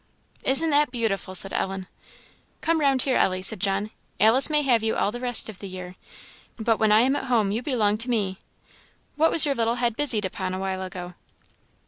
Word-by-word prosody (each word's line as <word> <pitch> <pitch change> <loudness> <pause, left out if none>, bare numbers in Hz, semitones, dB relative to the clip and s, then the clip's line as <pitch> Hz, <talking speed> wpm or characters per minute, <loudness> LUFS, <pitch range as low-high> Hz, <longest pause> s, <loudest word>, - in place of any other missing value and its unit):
"Isn't 305 +5 +3
that 295 -1 +3
beautiful!" 215 -6 -3
said 195 +1 +5
Ellen. 190 -1 -3 0.8
"Come 330 0 0
round 275 -4 +2
here, 265 -2 0
Ellie," 185 0 0
said 190 - +1
John; 200 +3 -2 0.3
"Alice 225 +7 +4
may 300 -1 +1
have 245 -5 +2
you 220 0 -1
all 205 - 0
the 240 - -7
rest 245 -1 +2
of 215 -4 -7
the 200 - -8
year, 185 -1 -9 0.6
but 225 -1 0
when 220 -1 +1
I 215 +1 +5
am 265 +3 +2
at 270 - -4
home 225 -6 +1
you 220 +3 -2
belong 215 -6 0
to 235 +3 +2
me. 200 -5 -2 0.8
What 320 +2 +3
was 325 - +6
your 285 - 0
little 230 -2 -1
head 240 -2 -1
busied 240 -7 +2
upon 185 0 -4
a - - -5
while 190 0 -4
ago?" 180 -1 -8
225 Hz, 205 wpm, -24 LUFS, 195-260 Hz, 0.8 s, was